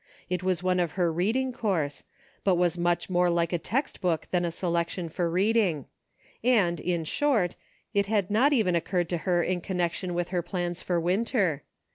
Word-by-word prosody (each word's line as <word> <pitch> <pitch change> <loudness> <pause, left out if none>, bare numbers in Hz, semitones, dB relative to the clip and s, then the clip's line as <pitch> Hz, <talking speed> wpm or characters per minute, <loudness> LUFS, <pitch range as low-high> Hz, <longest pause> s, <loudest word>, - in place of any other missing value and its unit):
It 180 -1 0
was 185 -2 0
one 185 0 +2
of 170 -4 0
her 175 -3 +1
reading 235 +10 0
course; 180 - -2 0.4
but 190 -2 +3
was 175 0 +2
much 175 0 0
more 180 -1 +2
like 170 0 +1
a 175 - +1
text 265 - -2
book 175 -4 0
than 180 -1 +1
a - - +1
selec 170 0 -1
tion 175 -3 -4
for 170 +1 -1
reading; 185 - +2 0.6
and, 200 -9 +3
in 170 -1 -1
short, 215 - +1 0.4
it 200 -1 +2
had 205 -2 0
not 250 +8 +4
even 215 -10 +2
occurred 175 0 0
to 175 - 0
her 175 -1 +3
in 180 0 -1
connection 180 0 -2
with 175 0 -1
her 180 -1 0
plans 175 0 -3
for 175 -2 0
Winter. 185 - +1
180 Hz, 190 wpm, -27 LUFS, 170-200 Hz, 0.6 s, not